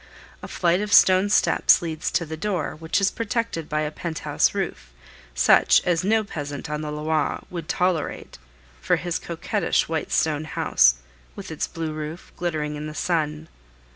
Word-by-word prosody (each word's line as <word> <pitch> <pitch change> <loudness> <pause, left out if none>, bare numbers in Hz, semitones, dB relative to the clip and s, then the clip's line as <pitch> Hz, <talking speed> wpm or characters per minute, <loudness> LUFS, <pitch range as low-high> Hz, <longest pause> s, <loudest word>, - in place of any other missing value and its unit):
A - - -7
flight 175 +1 +1
of 210 0 -4
stone 190 +1 +6
steps - - +4
leads 160 0 -3
to 170 - 0
the 160 0 -6
door, 185 0 -2
which 160 +4 -1
is 195 0 +2
protected 230 -8 -3
by 155 0 0
a 150 0 -2
pent 160 0 -5
house 150 +6 +2
roof, 70 - -4 0.4
such - - +5
as 175 -2 +1
no 220 +3 +2
peasant 145 -6 -6
on 150 0 -2
the 150 -1 -4
Loire 150 0 -1
would 170 -3 -6
tolerate 180 - -1 0.4
for - - +2
his 175 -2 -3
coquettish 170 +3 -1
white 160 -1 -3
stone 155 -1 +1
house, - - +3 0.4
with - - -8
its - - -2
blue 160 -1 -5
roof, 155 +3 -7
glittering 155 -4 -2
in 150 +1 -5
the 155 - -8
sun. 155 -3 -1
160 Hz, 170 wpm, -24 LUFS, 150-180 Hz, 0.4 s, stone